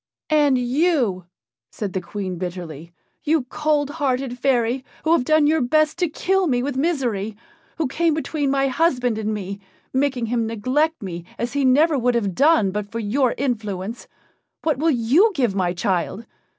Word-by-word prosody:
"And 290 Hz, -3 st, +4 dB
you," 250 Hz, -, +1 dB, 0.4 s
said 205 Hz, -3 st, -5 dB
the 190 Hz, -, -1 dB
Queen 185 Hz, -1 st, -5 dB
bitterly, 170 Hz, -3 st, -6 dB, 0.3 s
"you, 310 Hz, -2 st, +2 dB
cold 300 Hz, -2 st, 0 dB
hearted 265 Hz, -4 st, -2 dB
fairy, 250 Hz, -1 st, +1 dB, 0.2 s
who 315 Hz, -, +1 dB
have 335 Hz, -6 st, +4 dB
done 310 Hz, +2 st, +3 dB
your 310 Hz, +1 st, +3 dB
best 310 Hz, +6 st, +2 dB
to 355 Hz, -3 st, +1 dB
kill 380 Hz, +4 st, +1 dB
me 245 Hz, -4 st, +1 dB
with 280 Hz, 0 st, -2 dB
misery, 245 Hz, -, -1 dB, 0.4 s
who 320 Hz, -, 0 dB
came 325 Hz, +3 st, +1 dB
between 305 Hz, -2 st, -1 dB
my 275 Hz, 0 st, +2 dB
husband 250 Hz, -5 st, +1 dB
and 215 Hz, 0 st, -2 dB
me, 200 Hz, -1 st, -5 dB, 0.3 s
making 265 Hz, -3 st, 0 dB
him 230 Hz, 0 st, -1 dB
neglect 255 Hz, +7 st, 0 dB
me 175 Hz, -3 st, -6 dB
as 240 Hz, +2 st, -3 dB
he 285 Hz, -1 st, 0 dB
never 290 Hz, +3 st, +4 dB
would 245 Hz, 0 st, +1 dB
have 205 Hz, -5 st, 0 dB
done 275 Hz, -, +4 dB
but 205 Hz, +1 st, -4 dB
for 230 Hz, -, -4 dB
your 235 Hz, +4 st, +1 dB
influence 220 Hz, -4 st, -3 dB, 0.6 s
what 310 Hz, -4 st, 0 dB
will 325 Hz, +2 st, +2 dB
you 285 Hz, -, +4 dB
give 245 Hz, -9 st, +1 dB
my 185 Hz, -3 st, 0 dB
child? 185 Hz, +4 st, -2 dB
250 Hz, 170 wpm, -22 LUFS, 210-300 Hz, 0.6 s, And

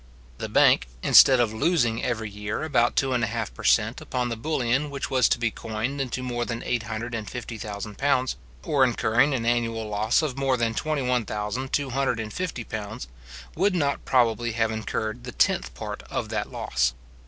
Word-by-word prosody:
The -, -, -4 dB
bank, -, -, +4 dB, 0.2 s
instead 130 Hz, -2 st, +8 dB
of 115 Hz, -3 st, +2 dB
losing 120 Hz, -3 st, +1 dB
every 110 Hz, -3 st, -1 dB
year 105 Hz, +4 st, -4 dB
about 125 Hz, -6 st, +2 dB
two 135 Hz, -1 st, +1 dB
and 120 Hz, -2 st, +1 dB
a -, -, +2 dB
half 115 Hz, 0 st, -3 dB
per -, -, -10 dB
cent. 115 Hz, +2 st, +2 dB
upon 125 Hz, -1 st, -2 dB
the 115 Hz, -, -2 dB
bullion 130 Hz, +2 st, 0 dB
which 140 Hz, -1 st, -5 dB
was 130 Hz, -2 st, +4 dB
to -, -, +2 dB
be 120 Hz, -1 st, 0 dB
coined 115 Hz, +7 st, -3 dB
into 130 Hz, -1 st, -3 dB
more 120 Hz, -1 st, -2 dB
than 115 Hz, 0 st, -4 dB
eight 120 Hz, -, 0 dB
hundred 115 Hz, +2 st, -4 dB
and 110 Hz, -2 st, -4 dB
fifty 125 Hz, -1 st, -6 dB
thousand 105 Hz, 0 st, -6 dB
pounds, 130 Hz, -2 st, +2 dB, 0.3 s
or 140 Hz, -, +2 dB
incurring 125 Hz, +2 st, +3 dB
an 115 Hz, -2 st, -2 dB
annual 115 Hz, -2 st, 0 dB
loss 105 Hz, +7 st, +1 dB
of 135 Hz, -3 st, -3 dB
more 135 Hz, -2 st, +2 dB
than 115 Hz, -1 st, 0 dB
£21,250 125 Hz, -, -2 dB
pounds, 110 Hz, -, -6 dB, 0.4 s
would 190 Hz, +3 st, +1 dB
not 140 Hz, -5 st, 0 dB
probably 120 Hz, -2 st, +2 dB
have 115 Hz, -1 st, +1 dB
incurred 110 Hz, +1 st, -3 dB
the 120 Hz, -, -6 dB
tenth -, -, +1 dB
part -, -, -6 dB
of -, -, -3 dB
that -, -, -2 dB
loss. 65 Hz, -2 st, 0 dB
120 Hz, 180 wpm, -25 LUFS, 110-130 Hz, 0.4 s, instead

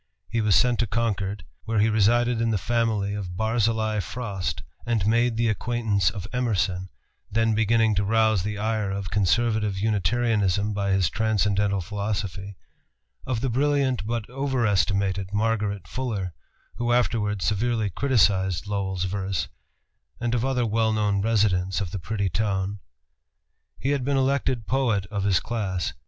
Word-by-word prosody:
He 115 Hz, -, +1 dB
was 105 Hz, -2 st, +3 dB
sent 125 Hz, -2 st, +3 dB
to 115 Hz, -, +1 dB
Concord, 105 Hz, -3 st, -2 dB, 0.2 s
where 110 Hz, 0 st, -1 dB
he 105 Hz, +1 st, +4 dB
resided 115 Hz, +2 st, +3 dB
in 115 Hz, -, +1 dB
the 110 Hz, -, +1 dB
family 110 Hz, -1 st, 0 dB
of 95 Hz, -4 st, -5 dB
Barzillai 110 Hz, 0 st, +1 dB
Frost, 100 Hz, 0 st, -4 dB, 0.2 s
and 115 Hz, -5 st, 0 dB
made 115 Hz, +1 st, +2 dB
the 115 Hz, 0 st, +2 dB
acquaintance 110 Hz, -4 st, +1 dB
of 100 Hz, -3 st, -6 dB
Emerson, 95 Hz, -7 st, 0 dB, 0.4 s
then 115 Hz, +1 st, +2 dB
beginning 110 Hz, 0 st, +3 dB
to 100 Hz, 0 st, +1 dB
rouse 110 Hz, -1 st, +3 dB
the 105 Hz, +2 st, -3 dB
ire 110 Hz, -1 st, -1 dB
of 95 Hz, -1 st, -4 dB
conservative 105 Hz, 0 st, +1 dB
Unitarianism 105 Hz, 0 st, +1 dB
by 100 Hz, -1 st, -1 dB
his 95 Hz, -3 st, +3 dB
transcendental 100 Hz, -2 st, +1 dB
philosophy, 100 Hz, 0 st, -4 dB, 0.7 s
of 125 Hz, -4 st, -1 dB
the 135 Hz, -, 0 dB
brilliant 135 Hz, -3 st, +1 dB
but 115 Hz, -1 st, -2 dB
overestimated 100 Hz, -7 st, 0 dB
Margaret 105 Hz, -3 st, 0 dB
Fuller, 105 Hz, -9 st, -3 dB, 0.4 s
who 120 Hz, 0 st, 0 dB
afterwards 105 Hz, -5 st, +1 dB
severely 110 Hz, 0 st, 0 dB
criticised 95 Hz, -6 st, +2 dB
Lowell's 95 Hz, -3 st, -2 dB
verse, 95 Hz, -1 st, -2 dB, 0.7 s
and 120 Hz, 0 st, -1 dB
of 120 Hz, -1 st, +1 dB
other 130 Hz, -2 st, +1 dB
well 110 Hz, 0 st, +1 dB
known 105 Hz, -2 st, +1 dB
residents 100 Hz, -4 st, +1 dB
of 95 Hz, -5 st, -3 dB
the 100 Hz, -, -4 dB
pretty 100 Hz, +2 st, -2 dB
town. 100 Hz, +1 st, -1 dB, 1.0 s
He 135 Hz, -, -1 dB
had 140 Hz, -3 st, 0 dB
been 140 Hz, +1 st, +1 dB
elected 130 Hz, -3 st, 0 dB
poet 120 Hz, -7 st, +1 dB
of 100 Hz, -2 st, -2 dB
his 95 Hz, -2 st, +3 dB
class. 100 Hz, -6 st, -2 dB
105 Hz, 145 wpm, -25 LUFS, 100-115 Hz, 1.0 s, he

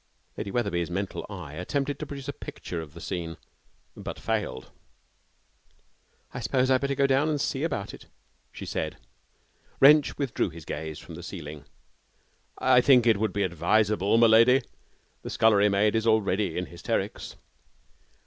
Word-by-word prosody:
Lady -, -, -5 dB
Wetherby's 100 Hz, -7 st, -1 dB
mental 95 Hz, +2 st, -3 dB
eye 70 Hz, -, -8 dB
attempted 135 Hz, -, -2 dB
to -, -, -5 dB
produce 140 Hz, -1 st, -8 dB
a 145 Hz, -, -3 dB
picture 85 Hz, -, -7 dB
of 80 Hz, -1 st, -11 dB
the -, -, -9 dB
scene, 85 Hz, -1 st, -5 dB, 0.6 s
but -, -, -7 dB
failed. 105 Hz, -, -3 dB, 1.6 s
'I -, -, -5 dB
suppose 130 Hz, -1 st, +1 dB
I -, -, +6 dB
had 130 Hz, -, +2 dB
better 140 Hz, 0 st, -1 dB
go 140 Hz, -, +3 dB
down 135 Hz, +3 st, +2 dB
and 150 Hz, -2 st, 0 dB
see 135 Hz, -1 st, -1 dB
about 130 Hz, -11 st, -3 dB
it,' -, -, -13 dB, 0.4 s
she -, -, -8 dB
said. -, -, -3 dB, 0.8 s
Wrench 145 Hz, +2 st, +6 dB
withdrew 135 Hz, -8 st, -1 dB
his 80 Hz, -2 st, -11 dB
gaze 80 Hz, -1 st, -5 dB
from 85 Hz, -, -11 dB
the 85 Hz, -, -8 dB
ceiling. 75 Hz, -5 st, -8 dB, 0.9 s
'I 125 Hz, -, +5 dB
think 125 Hz, -3 st, +5 dB
it 115 Hz, -3 st, +4 dB
would 110 Hz, +1 st, 0 dB
be 100 Hz, -, -1 dB
advisable, 100 Hz, +4 st, +2 dB
m'lady. 115 Hz, +3 st, +6 dB, 0.6 s
The -, -, -7 dB
scullery 105 Hz, -2 st, +4 dB
maid 105 Hz, +2 st, +2 dB
is 110 Hz, 0 st, 0 dB
already 100 Hz, -4 st, +1 dB
in 90 Hz, -, -1 dB
hysterics.' 85 Hz, 0 st, -4 dB
105 Hz, 160 wpm, -27 LUFS, 85-130 Hz, 1.6 s, I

